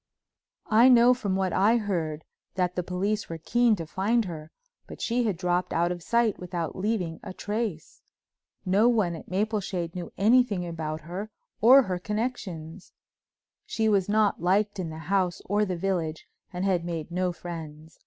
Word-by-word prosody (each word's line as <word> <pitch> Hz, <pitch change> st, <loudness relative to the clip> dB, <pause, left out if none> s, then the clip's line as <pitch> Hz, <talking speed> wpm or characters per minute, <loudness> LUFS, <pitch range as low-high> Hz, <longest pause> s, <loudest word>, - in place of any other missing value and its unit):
I 230 Hz, +4 st, +7 dB
know 245 Hz, 0 st, +7 dB
from 205 Hz, -6 st, -2 dB
what 190 Hz, -1 st, 0 dB
I 210 Hz, +5 st, +4 dB
heard 165 Hz, -8 st, -2 dB, 0.3 s
that 180 Hz, -2 st, 0 dB
the 180 Hz, -, 0 dB
police 195 Hz, +4 st, -2 dB
were 165 Hz, -, -4 dB
keen 235 Hz, +7 st, +2 dB
to 165 Hz, -4 st, -6 dB
find 210 Hz, +8 st, 0 dB
her, 160 Hz, -3 st, -7 dB, 0.4 s
but -, -, -10 dB
she 240 Hz, +1 st, 0 dB
had 205 Hz, -6 st, -1 dB
dropped 180 Hz, 0 st, -1 dB
out 170 Hz, +1 st, +1 dB
of 175 Hz, -1 st, -5 dB
sight 235 Hz, +3 st, +1 dB
without 175 Hz, -3 st, -4 dB
leaving 185 Hz, -5 st, -2 dB
a 185 Hz, -, -8 dB
trace. 210 Hz, -6 st, -4 dB, 0.6 s
No 200 Hz, +6 st, +4 dB
one 210 Hz, -8 st, +1 dB
at 160 Hz, -, -11 dB
Mapleshade 190 Hz, -3 st, -2 dB
knew 180 Hz, -1 st, -6 dB
anything 215 Hz, -3 st, +3 dB
about 160 Hz, -2 st, -4 dB
her 185 Hz, +6 st, -6 dB, 0.3 s
or 260 Hz, +5 st, +8 dB
her 185 Hz, -4 st, -3 dB
connections. 190 Hz, -6 st, -5 dB, 0.7 s
She 220 Hz, -1 st, 0 dB
was 200 Hz, -3 st, +2 dB
not 210 Hz, -3 st, +2 dB
liked 200 Hz, +3 st, +1 dB
in 175 Hz, -3 st, -3 dB
the 155 Hz, -, -7 dB
house 180 Hz, +2 st, 0 dB
or 205 Hz, +2 st, +1 dB
the 185 Hz, -3 st, -3 dB
village 170 Hz, -4 st, -2 dB, 0.3 s
and 180 Hz, 0 st, -3 dB
had 180 Hz, -3 st, +1 dB
made 170 Hz, -2 st, -5 dB
no 180 Hz, +1 st, 0 dB
friends. 160 Hz, -3 st, -9 dB
185 Hz, 170 wpm, -27 LUFS, 170-215 Hz, 0.7 s, or